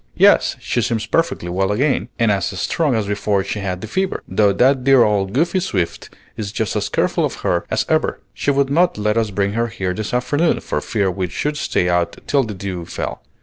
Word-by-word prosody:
"Yes, - - +5
she 120 - -1
seems 115 -2 -1
perfectly 165 - 0
well 95 +3 0
again, 135 +7 +1
and 115 -2 +3
as 95 -3 0
strong 140 - +1
as 110 -2 0
before 100 -1 0
she 100 +2 -4
had 95 -2 -3
the 110 - -6
fever, 190 - -2
though 100 +2 +3
that 125 +6 +3
dear 135 -2 +6
old 100 -3 +1
Goody 170 - +1
Swift 95 - -2 0.3
is 100 -2 -4
just 110 -1 -2
as - - -1
careful - - +1
of - - -1
her 85 -1 0
as - - 0
ever. - - +1
She - - -2
would 140 -1 +2
not 170 0 +3
let 105 0 0
us 115 -2 +1
bring 100 0 -1
her 115 +1 0
here 95 -4 -3
this 110 +2 -4
afternoon, 125 +7 +1
for - - -2
fear 100 -4 0
we 90 0 -2
should 150 - -2
stay 90 -10 0
out 90 -1 0
till 140 - +2
the 110 -5 -4
dew 95 -2 -5
fell. - - -5
105 Hz, 220 wpm, -19 LUFS, 95-130 Hz, 0.3 s, dear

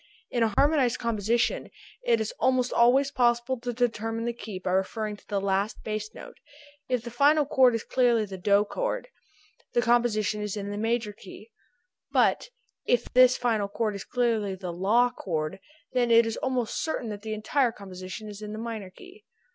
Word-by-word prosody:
In 240 - 0
a 225 -1 +3
harmonized 280 -5 +3
composition 235 - 0 0.3
it 480 -2 +3
is - - -2
almost 255 -1 +2
always 265 +4 +4
possible 240 0 +1
to 245 +1 -3
determine 225 -1 -1
the 240 - -1
key 220 -4 -7
by 185 0 -3
referring 210 +3 -1
to - - -23
the 200 -2 -1
last 195 +2 -1
bass 215 0 -4
note; - - -11 0.5
if 250 -3 0
the 235 - -7
final 290 +5 +4
chord 260 -4 +4
is 230 - -3
clearly 240 -4 +2
the 195 -1 -8
DO 200 +2 +3
chord - - -3 0.6
the 240 - +3
composition 220 -3 +2
is 210 0 -3
in 200 0 -4
the 205 - -4
major 225 -1 -1
key, 210 +2 -13 0.6
but - - +2 0.3
if 240 -1 0
this 255 0 +6
final 225 -4 0
chord 215 +1 -2
is 200 - -6
clearly 225 -5 0
the 180 -2 -6
LA 220 +8 +3
chord 165 -1 -3 0.3
then 245 -2 +2
it 230 0 +6
is 225 0 -2
almost 255 -4 -1
certain 280 -7 -3
that 205 -1 -6
the 215 0 -4
entire 240 +4 +1
composition 190 0 -8
is 210 0 -9
in 210 0 -6
the - - -6
minor 220 -4 -5
key. 370 - -16
230 Hz, 185 wpm, -27 LUFS, 210-245 Hz, 0.6 s, this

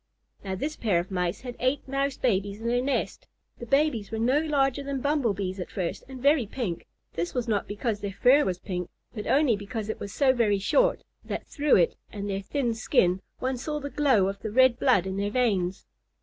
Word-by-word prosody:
Now 190 -1 -3
this 295 +10 -3
pair 200 -7 +1
of 180 +3 -5
Mice 180 -2 -1
had 245 -1 -7
eight 255 +3 0
Mouse 275 0 -1
babies 200 -3 0
in 225 - -8
their 240 +1 +2
nest. 275 +2 -2 0.3
The 240 - -7
babies 275 -6 +2
were 220 - -4
no 250 +6 +3
larger 285 -4 +1
than 275 -1 -3
Bumble 280 -6 +1
Bees 190 -1 -3
at 180 - -5
first 180 -4 -3
and 265 -1 -8
very 280 -3 +3
pink. 200 -7 -4 0.3
This 170 +1 -3
was 245 -1 -1
not 210 -3 0
because 210 +1 -2
their 200 -1 -4
fur 275 +4 +6
was 180 -2 -1
pink, 180 -1 -5 0.2
but 210 -3 -6
only 275 -5 +4
because 210 +1 -5
it 220 - -3
was 200 - -6
so 265 +2 +3
very 220 -5 +2
short - - +2 0.2
that - - -5
through 295 -1 +2
it 175 - +3 0.2
and 205 -1 -5
their 195 -1 -2
thin 240 +3 -1
skin 185 -5 +2 0.2
one 260 0 -2
saw 300 +4 -3
the 285 0 -6
glow 260 -10 +3
of 195 0 -4
the 220 - -4
red 255 +2 +4
blood 245 -9 +3
in 190 0 -3
their 200 +1 0
veins. 200 -6 0
230 Hz, 220 wpm, -27 LUFS, 195-270 Hz, 0.3 s, fur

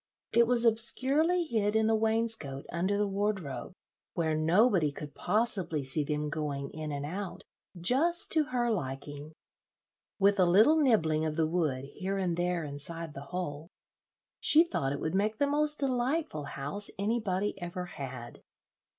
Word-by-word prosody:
It 235 0 +4
was 240 -1 +3
obscurely 275 +10 +4
hid 220 -8 -1
in 220 0 +3
the 225 - +2
wainscot 220 -11 0
under 185 +4 0
the 205 0 +1
wardrobe, 195 -6 -3 0.4
where 160 -2 0
nobody 165 - +3
could 145 0 -9
possibly 190 -6 0
see 135 +3 0
them 150 +1 -2
going 145 -3 -4
in 155 -1 -6
and 145 0 -4
out 185 +4 -6 0.4
just 290 - +4
to 315 -2 +3
her 245 -4 -1
liking. 145 -3 -5 0.8
With 200 0 +3
a 185 - +5
little 215 - +5
nibbling 160 - +2
of 155 -1 -2
the 160 -1 +1
wood 155 -6 -1
here 190 +7 -5
and 180 -3 -1
there 175 -1 -1
inside 150 +2 -6
the 140 0 -9
hole, 165 -3 -5 0.7
she 315 +2 +6
thought 140 - -2
it 140 - -3
would 160 - -3
make 210 +3 0
the 285 - +2
most 300 +1 +1
delightful 260 - -1
house 145 +10 -4
anybody 205 -1 -1
ever 175 +1 -5
had. 130 -8 -8
185 Hz, 155 wpm, -30 LUFS, 150-225 Hz, 0.8 s, she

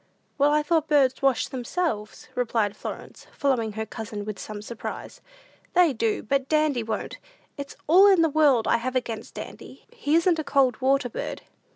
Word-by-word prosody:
"Why, 295 +1 +4
I 300 - +1
thought 320 0 +1
birds 270 -4 +3
washed 270 -3 +1
themselves," 245 -4 -3
replied 225 -4 0
Florence, - - -8
following 245 -6 0
her 220 +1 -3
cousin 215 -2 -6
with 210 -3 -6
some 210 -1 -7
surprise. 230 +1 -7 0.5
"They 350 -5 +4
do, 225 -2 -1
but 270 +3 -1
Dandy 305 -5 +2
won't; 220 -1 -4 0.4
it's 280 0 -7
all 370 +6 +7
in 380 -4 +5
the - - +4
world 290 -6 +3
I - - +3
have 255 +2 -4
against 230 -3 -3
Dandy; - - -10
he 320 -11 0
isn't 335 0 +3
a - - -1
cold 275 -3 +2
water 270 0 +2
bird." 235 - -6
265 Hz, 175 wpm, -25 LUFS, 225-305 Hz, 0.5 s, all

